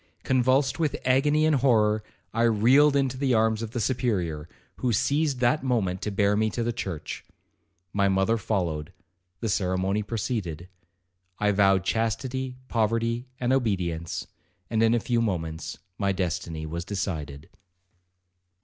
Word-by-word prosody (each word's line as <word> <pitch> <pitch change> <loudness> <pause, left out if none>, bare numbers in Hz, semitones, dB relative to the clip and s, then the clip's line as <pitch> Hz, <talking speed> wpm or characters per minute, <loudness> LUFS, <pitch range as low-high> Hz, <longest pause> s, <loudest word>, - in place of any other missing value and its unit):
Convulsed 130 +3 +2
with 155 -3 +1
agony 145 +4 +3
and 155 -2 +3
horror, 110 -5 +3 0.3
I 115 - 0
reeled 120 +6 +5
into 135 -2 +1
the 130 -2 +2
arms 110 0 +2
of 115 - -4
the 120 - -4
Superior, 100 - -1 0.3
who 125 - 0
seized 140 +4 +1
that 125 +5 +2
moment 105 -8 0
to - - -2
bear 100 0 +2
me 110 +1 +2
to 120 - +1
the 120 +1 -1
church. 95 - -5 0.7
My 100 -1 +2
mother 95 +4 +2
followed,—the 90 0 -4
ceremony 95 +1 0
proceeded. 100 - -3 0.7
I 105 0 +2
vowed 95 -2 +3
chastity, 125 +5 -2
poverty, 115 +1 0
and 125 +1 +1
obedience, 90 -10 -1 0.5
and 110 -1 +2
in 115 +1 +4
a - - +2
few 120 0 0
moments 80 -7 -3 0.2
my 100 -1 +2
destiny 85 -3 -3
was 85 +2 -4
decided. 80 -7 -4
110 Hz, 140 wpm, -26 LUFS, 95-125 Hz, 0.7 s, reeled